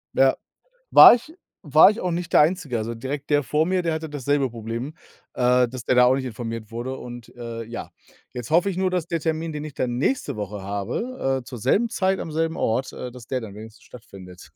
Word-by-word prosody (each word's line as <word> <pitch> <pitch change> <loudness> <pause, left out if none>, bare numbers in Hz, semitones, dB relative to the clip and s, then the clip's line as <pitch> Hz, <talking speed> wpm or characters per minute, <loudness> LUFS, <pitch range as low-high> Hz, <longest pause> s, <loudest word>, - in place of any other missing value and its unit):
Ja, 135 0 +4 0.6
war - - +10
ich 245 +6 -6 0.3
war 150 +2 +7
ich 215 - -4
auch 180 - -1
nicht 170 0 -3
der - - +7
Einzige. 160 -5 0
Also 115 +1 -3
direkt 135 +5 -6
der 145 0 +3
vor 150 +4 +1
mir, 185 +1 0
der 165 -2 0
hatte 160 -1 -5
dasselbe 145 -1 0
Problem, 115 +5 -6 0.4
äh, 125 0 +3
dass 120 0 -8
der - - +2
da 125 0 +6
auch 125 +1 +5
nicht 130 -1 -2
informiert 115 -2 -6
wurde. 120 +3 -4
Und, 120 -1 -10
äh, 115 -1 -6
ja, 115 +1 -7 0.4
jetzt 125 +1 -7
hoffe 175 +5 +3
ich 190 - -3
nur, 185 0 +1
dass 180 -3 -1
der 170 - -2
Termin, 160 +1 -2
den 150 0 -5
ich 155 - -7
dann 125 -2 -2
nächste 140 - -1
Woche 105 -1 -5
habe, 135 - -3
äh, - - -15
zur 125 - -8
selben 195 - +2
Zeit, 190 -3 0
am 160 - -6
selben 160 +1 -1
Ort, 120 +4 -1
äh, 125 - -7
dass 120 -2 -12
der 130 - -1
dann 110 -4 -9
wenigstens 110 +2 -12
stattfindet. 95 -6 -13
130 Hz, 225 wpm, -23 LUFS, 115-160 Hz, 0.6 s, war